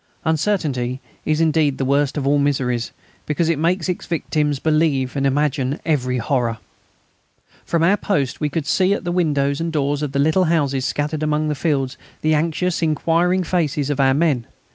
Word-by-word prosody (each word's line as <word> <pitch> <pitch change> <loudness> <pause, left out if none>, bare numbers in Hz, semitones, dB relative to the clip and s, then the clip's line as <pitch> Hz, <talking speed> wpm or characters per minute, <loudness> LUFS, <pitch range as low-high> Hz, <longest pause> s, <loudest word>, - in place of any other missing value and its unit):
Uncertainty 150 -7 0 0.3
is 155 0 +1
indeed 155 -4 +2
the 135 - -1
worst 140 +2 +1
of 140 - -2
all 145 +1 +3
miseries, 130 -4 0 0.4
because 160 +2 0
it 165 -3 +1
makes 170 +1 +1
its 180 - -3
victims 150 -3 -1
believe 150 -3 +1
and 140 0 +1
imagine 140 0 0
every 130 -5 0
horror. 120 -2 0 1.1
From 170 -1 0
our 195 +5 +4
post 140 - -1
we 150 - +1
could 150 +1 -3
see 185 +5 +2
at - - -6
the 175 - -2
windows 145 -5 +1
and 165 0 -2
doors 145 -1 0
of 150 -2 -2
the 140 - -2
little 160 +6 +3
houses 140 -5 +1
scattered 150 +1 -2
among 155 0 0
the - - +1
fields 135 -4 -1 0.2
the 155 0 +2
anxious 165 +3 0
and 165 - +2
inquiring 170 +4 +1
faces 155 -5 0
of 145 - -2
our 135 -1 +4
men. 140 -7 +1
150 Hz, 185 wpm, -20 LUFS, 140-165 Hz, 1.1 s, our